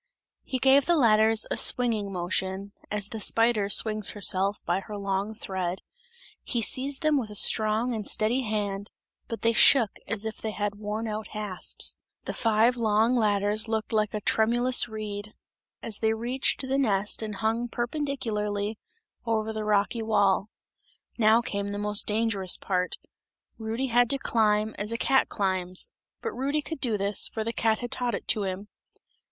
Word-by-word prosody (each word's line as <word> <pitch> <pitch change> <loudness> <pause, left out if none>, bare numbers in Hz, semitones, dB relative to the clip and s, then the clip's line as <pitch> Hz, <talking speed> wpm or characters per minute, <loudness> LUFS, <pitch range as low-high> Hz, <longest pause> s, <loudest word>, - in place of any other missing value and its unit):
He 260 - -3
gave 270 +2 +4
the 345 - +4
ladders 220 -4 +4
a - - 0
swinging 225 -5 +2
motion 190 +2 -3 0.2
as 205 -1 -1
the 225 - -6
spider 225 -1 +1
swings 215 0 +2
herself 200 0 0
by 175 +2 0
her 205 +2 -8
long 200 +2 -2
thread 190 -4 -4 0.6
he 240 - -2
seized 265 +6 +2
them 305 -2 +3
with 225 -4 -5
a 210 - -8
strong 220 +4 +3
and 215 -3 -4
steady 225 +5 +1
hand, 205 -3 -3 0.4
but 230 - -6
they 230 0 +3
shook 230 -2 +5
as 220 -1 -2
if 220 - -4
they 220 - -4
had 205 -1 -2
worn 215 +2 -3
out 215 0 -4
hasps. 205 -4 0 0.3
The - - -4
five 225 +2 +2
long 225 +1 +2
ladders 210 -1 +1
looked 220 0 -3
like 215 -1 0
a 210 - -3
tremulous 240 +4 +3
reed, 215 -1 -6 0.5
as 220 -3 -1
they 220 0 +1
reached 245 +4 0
the 270 0 -1
nest 210 -6 +1
and 215 -2 -4
hung 225 +3 -1
perpendicularly 225 -6 -3 0.5
over 220 -1 -1
the 215 0 -4
rocky 210 +2 +1
wall. 205 -3 +2 0.7
Now 220 +1 +5
came 200 -3 -3
the 205 0 -4
most 210 0 +1
dangerous 210 -4 +1
part; 180 -2 -1 0.6
Rudy 225 +4 -2
had 245 -1 +3
to 275 - +3
climb 215 -4 +1
as 210 +2 -3
a 230 - -1
cat 265 +2 +2
climbs; 185 -2 -1 0.3
but 455 - -2
Rudy 285 +3 -1
could 320 -1 -6
do 230 -4 0
this, 200 +1 0
for 220 - -4
the 230 +1 -3
cat 220 -1 +1
had 245 -1 -6
taught 245 -1 -1
it - - -8
to 215 - +3
him. 190 +2 -5
215 Hz, 170 wpm, -27 LUFS, 205-235 Hz, 0.7 s, shook